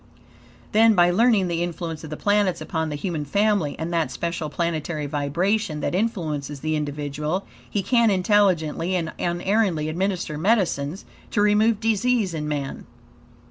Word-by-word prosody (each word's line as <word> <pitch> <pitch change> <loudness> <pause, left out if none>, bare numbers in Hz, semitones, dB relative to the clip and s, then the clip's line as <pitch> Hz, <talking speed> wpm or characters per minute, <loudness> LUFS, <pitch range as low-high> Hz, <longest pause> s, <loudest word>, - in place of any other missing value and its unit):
Then, 220 0 +5
by 175 -1 +5
learning 215 -1 +3
the 170 -1 -1
influence 170 -2 -4
of 160 - -7
the 155 - -5
planets 205 -3 +1
upon 160 -2 -2
the 150 - -3
human 155 0 -3
family; 200 -1 +1
and 165 +2 -4
that 165 -5 +1
special 165 +4 -3
planetary 160 -1 -2
vibration 155 +5 -1
that - - -1
influences 155 -9 -2
the 155 0 -1
individual; 150 +4 -3 0.2
he 205 - -1
can 235 0 +3
intelligently 185 -4 +2
and 165 -3 -2
unerringly 175 -2 0
administer 175 -2 -2
medicines 180 -4 0 0.2
to 205 - +1
remove 210 +1 +3
disease 225 -2 +1
in 150 -2 -3
man. 145 -2 -4
175 Hz, 145 wpm, -23 LUFS, 155-205 Hz, 0.2 s, Then